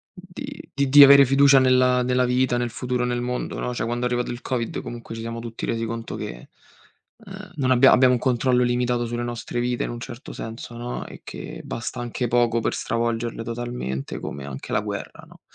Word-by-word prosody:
di 180 -1 -9 0.3
di 145 +2 +10
avere 140 0 +9
fiducia 135 +1 +6
nella 125 -1 +4
nella 125 0 +2
vita, 125 0 +1
nel 120 0 -1
futuro 125 +1 -2
nel 120 0 -1
mondo, 125 0 -3
no? 125 - -2
Cioè - - -2
quando 120 +1 -2
è 125 - +2
arrivato 120 0 -1
il 120 0 -6
covid 120 -3 -2
comunque 120 -1 -8
ci 115 - -6
siamo 115 0 -5
tutti 115 -1 -7
resi 115 0 -1
conto 115 0 -5
che, - - -7 0.7
uhm, - - -11
non 130 -3 0
abbia 130 +1 +6
abbiamo 125 0 +5
un 120 - -1
controllo 125 0 +2
limitato 120 0 0
sulle 120 +1 -3
nostre 120 0 -4
vite 120 0 -1
in - - -4
un 120 - -6
certo 120 +1 -8
senso, 115 +1 -7
no, 120 +1 -5
e - - -12
che - - -8
basta 120 +1 -5
anche 120 0 -3
poco 120 -1 +2
per - - -1
stravolgerle 115 0 -2
totalmente 115 - -4
come 70 - -6
anche 70 -1 -7
la - - +2
guerra, - - -6
no, - - -18
120 Hz, 205 wpm, -23 LUFS, 115-125 Hz, 0.7 s, di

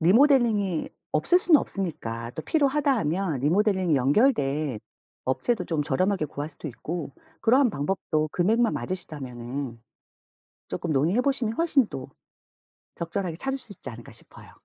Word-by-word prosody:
리모델링이 210 - +4 0.2
없을 360 - +4
순 355 -3 +5
없으니까 115 - -4
또 160 - -5
필요하다 285 - +2
하면 165 - -1
리모델링이 185 - +2
연결된 140 - +2 0.5
업체도 220 - +1
좀 160 -3 -1
저렴하게 185 +5 +1
구할 145 +2 -6
수도 150 - -10
있고 150 +4 -5 0.3
그러한 255 +2 +4
방법도 155 -1 -1
금액만 225 +6 +2
맞으시다면은. 130 -8 -4 0.9
조금 170 - -3
논의해 155 - +2
보시면 260 -5 0
훨씬 305 -7 +3
또 130 - -7 0.9
적절하게 170 0 -3
찾으실 270 +5 -2
수 - - -9
있지 170 - -9
않을까 120 -1 -10
싶어요. - - -12
175 Hz, 340 characters per minute, -26 LUFS, 145-235 Hz, 0.9 s, 순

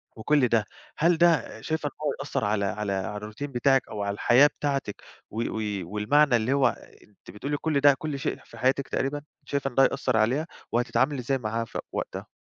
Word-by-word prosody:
وكل 135 +4 +2
ده، 110 -3 +2 0.3
هل 170 +2 +3
ده 165 -9 +2
شايفة 155 +1 -2
إن - - -4
هو 145 - +1
هيأثّر 140 -5 -2
على 105 -1 +1
على 100 +1 -2
على 95 +2 -3
الروتين 110 +7 -6
بتاعِك 135 +2 +2
أو 105 -2 -4
على 100 0 -1
الحياة 125 +7 +5
بتاعتِك 140 -7 -3 0.3
و 110 - -9 0.2
وي 105 -3 -2
والمعنى 120 - +3
اللي 120 +4 +1
هو 140 -1 +4 0.4
أنتِ 100 -3 -16
بتقولي 140 +9 -3
كل 155 -2 0
ده 145 0 +7
كل 150 -2 -4
شيء - - -2
في - - -14
حياتِك 135 +1 +1
تقريبًا، 145 +2 -2 0.2
شايفة 140 -1 -1
إن 120 - -16
ده 135 - +6
هيأثّر 130 -3 +1
عليها؟ 130 +9 +1 0.2
وهتتعاملي 130 +4 +1
إزاي 135 +2 0
معاها 115 0 -2
في - - -6
وقتها؟ - - -5
130 Hz, 200 wpm, -26 LUFS, 110-145 Hz, 0.4 s, ده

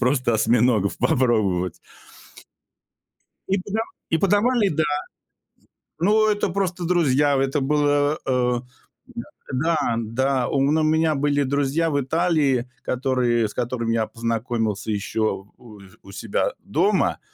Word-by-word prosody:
просто 125 -1 +1
осьминогов 110 -2 +2
попробовать. 110 - +1 1.7
И 195 - +2
подава 210 +4 -3 0.3
и 160 - +2
подавали, 205 +3 +2
да. 155 -1 0 1.2
Ну, 215 +4 +3
это 205 -2 0
просто 180 -1 -2
друзья. 145 -5 +2
Это 135 +2 0
было, 145 +1 +1
э, 125 -2 +1 0.5
да, 235 - -5 0.3
да, 155 -3 0
да. 125 +3 0
У 135 - +1
мн 145 +3 +2
у 155 - +1
меня 160 0 +2
были 145 0 +1
друзья 140 +4 0
в 145 -1 0
Италии, 140 -4 +1
которые 125 -3 0
с - - -11
которыми 120 -2 -2
я 110 -1 0
познакомился 115 -2 -2
еще 105 0 -2
у 110 -4 -14 0.2
у - - -13
себя - - -2
дома. - - +1
135 Hz, 125 wpm, -22 LUFS, 120-160 Hz, 1.7 s, Ну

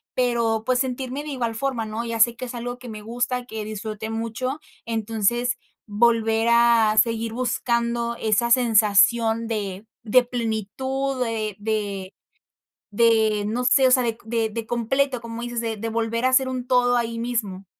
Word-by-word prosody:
pero, 235 -3 +1
pues 255 -1 +2
sentirme 260 +1 -3
de 305 - -7
igual 245 -5 -2
forma, 240 -1 -2
¿no?, 220 +2 -4
ya 230 -1 -3
sé 235 +1 +5
que 255 - -6
es 245 - -7
algo 245 +1 -5
que 250 -1 -10
me 215 -1 -7
gusta, 245 +2 -2
que 220 -3 -6
disfruté 215 +1 -5
mucho, 230 +5 -3 0.3
entonces, 230 +1 0 0.3
volver 225 +1 +2
a 235 -2 +4
seguir 225 0 +2
buscando 235 -1 -1
esa 225 +1 +1
sensación 230 -1 +4
de 205 -3 -4 0.2
de 245 +3 +5
plenitud 250 +3 -2
de 220 -3 -3
de 205 -3 -3 0.8
de 220 -1 +3
no 235 +4 -1
sé, 265 +1 +5
o - - +2
sea, 255 -1 +5
de 230 -2 -2 0.3
de 225 +1 -5
completo, 250 +3 0
como 230 0 -7
dices, 240 0 -4
de 225 -1 -2
de 225 +2 -4
volver 230 +1 -1
a - - +4
hacer 260 0 +3
un 255 -1 -4
todo 245 -1 +3
ahí 230 -1 -2
mismo. 220 -5 -3
230 Hz, 165 wpm, -23 LUFS, 220-245 Hz, 0.8 s, sé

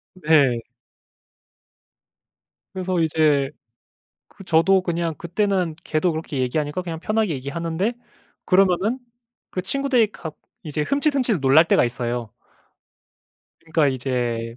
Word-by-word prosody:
네. 150 -9 +3 2.1
그래서 185 -1 -1
이제 155 -4 +2 0.8
그 195 - -14
저도 185 +3 +4
그냥 170 -2 -2
그때는 180 0 -1
걔도 160 +3 +1
그렇게 155 -3 -4
얘기하니까 145 +6 -1
그냥 165 -3 -6
편하게 215 -1 0
얘기하는데 165 - -2 0.5
그러면은 195 +5 +3 0.5
그 185 - -3
친구들이 250 0 +1
가 160 - -7 0.3
이제 150 -3 -3
흠칫흠칫 275 - +1
놀랄 135 +4 +6
때가 - - +4
있어요. 120 -1 -3 1.3
그러니까 160 -2 +1
이제 120 -3 -2
165 Hz, 260 characters per minute, -22 LUFS, 140-190 Hz, 2.1 s, 놀랄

